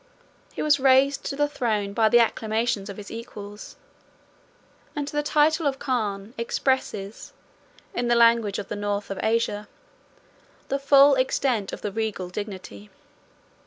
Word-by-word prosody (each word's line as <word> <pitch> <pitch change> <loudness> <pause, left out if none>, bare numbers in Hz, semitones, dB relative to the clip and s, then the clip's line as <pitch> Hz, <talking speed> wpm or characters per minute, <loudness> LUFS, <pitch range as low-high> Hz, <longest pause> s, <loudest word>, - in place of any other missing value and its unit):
He - - -3
was 300 -2 +3
raised 270 +1 +4
to - - -3
the 290 +1 +1
throne 215 -8 -2
by 220 0 +3
the 240 - +5
acclamations 220 -2 0
of 200 - -7
his 205 -1 -9
equals; 215 -3 -9 1.2
and 290 -1 -3
the 295 0 -1
title 305 +1 +2
of 270 -1 -1
Khan 215 -6 -2
expresses, 230 -4 -2 0.6
in 240 0 -1
the 240 - +3
language 230 -3 +4
of 205 - -5
the - - -4
North 205 0 -3
of 195 - -4
Asia, 220 -2 0 1.0
the 275 - 0
full 280 0 +6
extent 255 -5 0
of - - -7
the 210 - -2
regal 210 -4 -3
dignity. 185 - -7
230 Hz, 145 wpm, -25 LUFS, 205-270 Hz, 1.2 s, full